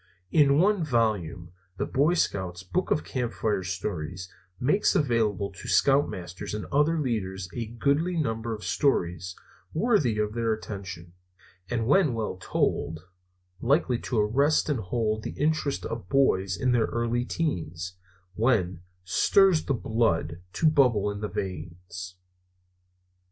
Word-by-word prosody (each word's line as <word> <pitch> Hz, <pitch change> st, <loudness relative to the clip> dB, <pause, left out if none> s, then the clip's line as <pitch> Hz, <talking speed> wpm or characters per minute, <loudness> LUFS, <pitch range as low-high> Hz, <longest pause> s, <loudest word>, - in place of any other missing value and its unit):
In 140 Hz, -3 st, +5 dB
one 195 Hz, +2 st, +3 dB
volume, 105 Hz, -, 0 dB, 0.3 s
the -, -, -1 dB
Boy 150 Hz, +6 st, +2 dB
Scouts 95 Hz, -, -1 dB
Book 180 Hz, -, -1 dB
of -, -, +1 dB
Campfire 115 Hz, -5 st, -1 dB
Stories 90 Hz, -1 st, -4 dB, 0.3 s
makes 195 Hz, +12 st, +2 dB
available 110 Hz, -, +1 dB
to 95 Hz, -, -10 dB
scoutmasters 95 Hz, -3 st, +1 dB
and 105 Hz, -, -4 dB
other 150 Hz, +4 st, +3 dB
leaders 100 Hz, -9 st, -2 dB
a 115 Hz, -2 st, -3 dB
goodly 145 Hz, +9 st, 0 dB
number 115 Hz, -6 st, -1 dB
of 105 Hz, -1 st, -5 dB
stories 90 Hz, -, 0 dB, 0.4 s
worthy 160 Hz, -, +2 dB
of 105 Hz, 0 st, 0 dB
their 115 Hz, -1 st, +1 dB
attention, 95 Hz, -5 st, -7 dB, 0.6 s
and 115 Hz, -2 st, -1 dB
when 145 Hz, -1 st, +3 dB
well 110 Hz, -4 st, -3 dB
told 80 Hz, -1 st, -1 dB, 0.6 s
likely 130 Hz, -2 st, +2 dB
to 125 Hz, -, -3 dB
arrest 135 Hz, +10 st, +2 dB
and 145 Hz, -5 st, +1 dB
hold 110 Hz, +2 st, -1 dB
the -, -, -7 dB
interest 150 Hz, -2 st, 0 dB
of 115 Hz, -5 st, -5 dB
boys 95 Hz, -9 st, +2 dB
in 130 Hz, -, +2 dB
their 120 Hz, -2 st, +3 dB
early 120 Hz, +1 st, -1 dB
teens, 90 Hz, -, -3 dB, 0.4 s
when 95 Hz, -6 st, +1 dB, 0.2 s
"stirs 175 Hz, -, +4 dB
the 140 Hz, -, +1 dB
blood 85 Hz, -9 st, 0 dB
to 160 Hz, -, +2 dB
bubble 125 Hz, -9 st, +3 dB
in 100 Hz, 0 st, -6 dB
the 105 Hz, -, -2 dB
veins." 90 Hz, 0 st, -6 dB
110 Hz, 135 wpm, -27 LUFS, 95-140 Hz, 0.6 s, In